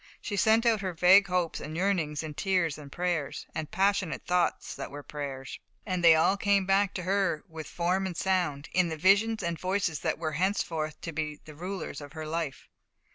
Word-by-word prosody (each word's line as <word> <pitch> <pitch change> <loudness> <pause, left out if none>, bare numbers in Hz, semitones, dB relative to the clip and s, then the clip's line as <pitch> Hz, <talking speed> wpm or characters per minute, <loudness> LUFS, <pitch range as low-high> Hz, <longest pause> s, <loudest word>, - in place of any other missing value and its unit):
She 205 - -4
sent 220 +3 +4
out 225 -3 +3
her 185 -2 -3
vague 185 +4 +6
hopes 180 -2 0
and 155 +2 -6
yearnings 170 -6 0
in 155 -1 -6
tears 170 -3 0
and 140 -2 -11
prayers, 175 -5 -2
and 155 -2 -4
passionate 195 -4 0
thoughts 180 -1 0
that - - -6
were 145 0 -8
prayers, 140 -2 -6 0.3
and 185 -3 -2
they 165 -1 +8
all 160 +5 +3
came 200 -1 +2
back 195 +1 +2
to 180 - -3
her 190 -4 0
with 160 -2 -8
form 180 +3 0
and 175 -3 -6
sound, 175 -7 0
in 180 -2 +3
the 160 - -4
visions 205 +6 +3
and 170 -1 -2
voices 185 -4 -1
that - - -1
were 160 -1 -2
henceforth 160 -3 -1
to 165 - -5
be 155 -1 -4
the 155 - -10
rulers 175 -2 -5
of 145 -1 -10
her 155 -1 -6
life. 155 -3 -4
175 Hz, 200 wpm, -29 LUFS, 155-195 Hz, 0.3 s, they